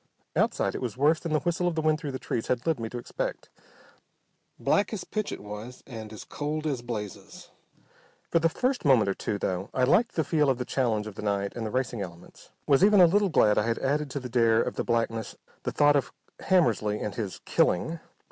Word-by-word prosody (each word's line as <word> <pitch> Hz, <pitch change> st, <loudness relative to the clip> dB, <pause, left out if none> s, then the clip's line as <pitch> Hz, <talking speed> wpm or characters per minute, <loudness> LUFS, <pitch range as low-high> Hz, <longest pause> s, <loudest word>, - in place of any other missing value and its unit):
Outside -, -, +1 dB
it -, -, -5 dB
was 125 Hz, -2 st, -4 dB
worse 150 Hz, +4 st, +3 dB
than 165 Hz, -, -5 dB
the 155 Hz, -, +2 dB
whistle 175 Hz, +1 st, 0 dB
of 175 Hz, -, -1 dB
the 160 Hz, -, 0 dB
wind 155 Hz, 0 st, +2 dB
through 150 Hz, -4 st, -4 dB
the 130 Hz, -, -4 dB
trees 115 Hz, -2 st, -3 dB
had 125 Hz, -1 st, -1 dB
led 160 Hz, -5 st, +1 dB
me 115 Hz, -1 st, -4 dB
to 125 Hz, -, -6 dB
expect. 120 Hz, -, -4 dB, 1.1 s
Black 200 Hz, -, +2 dB
as 205 Hz, -, -3 dB
pitch 215 Hz, -1 st, -3 dB
it -, -, -7 dB
was, 105 Hz, +4 st, -8 dB
and 110 Hz, -4 st, -8 dB
as 110 Hz, -, -8 dB
cold 155 Hz, +1 st, -4 dB
as 140 Hz, -5 st, -1 dB
blazes. 110 Hz, -4 st, -7 dB, 0.8 s
For 170 Hz, -, +4 dB
the 165 Hz, 0 st, +3 dB
first 255 Hz, +9 st, -1 dB
moment 130 Hz, -9 st, +4 dB
or -, -, +1 dB
two, 105 Hz, -, -3 dB
though, 95 Hz, 0 st, -2 dB
I 130 Hz, -, +2 dB
liked 195 Hz, -, +3 dB
the 160 Hz, -, +2 dB
feel 150 Hz, -3 st, +2 dB
of 130 Hz, -, +2 dB
the 125 Hz, -, -3 dB
challenge 115 Hz, -6 st, 0 dB
of 110 Hz, -, -7 dB
the -, -, -8 dB
night 100 Hz, -1 st, -1 dB
and 115 Hz, -2 st, -3 dB
the -, -, -3 dB
racing 120 Hz, -2 st, -2 dB
elements, 85 Hz, -3 st, -10 dB, 0.2 s
was 140 Hz, +4 st, +4 dB
even 205 Hz, 0 st, +6 dB
a 180 Hz, -, +9 dB
little 200 Hz, +3 st, +3 dB
glad 105 Hz, -10 st, +4 dB
I 105 Hz, -, 0 dB
had 115 Hz, -, 0 dB
added 145 Hz, +2 st, 0 dB
to 140 Hz, -, -3 dB
the 130 Hz, -, -6 dB
dare 115 Hz, -2 st, +3 dB
of -, -, -3 dB
the -, -, -1 dB
blackness 115 Hz, -2 st, -1 dB, 0.3 s
the -, -, -3 dB
thought 145 Hz, 0 st, +4 dB
of 140 Hz, -, 0 dB, 0.3 s
Hammersly 110 Hz, -, +2 dB
and 105 Hz, -, -3 dB
his 100 Hz, -4 st, -4 dB
"killing." 160 Hz, -, +1 dB
125 Hz, 230 wpm, -27 LUFS, 110-155 Hz, 1.1 s, a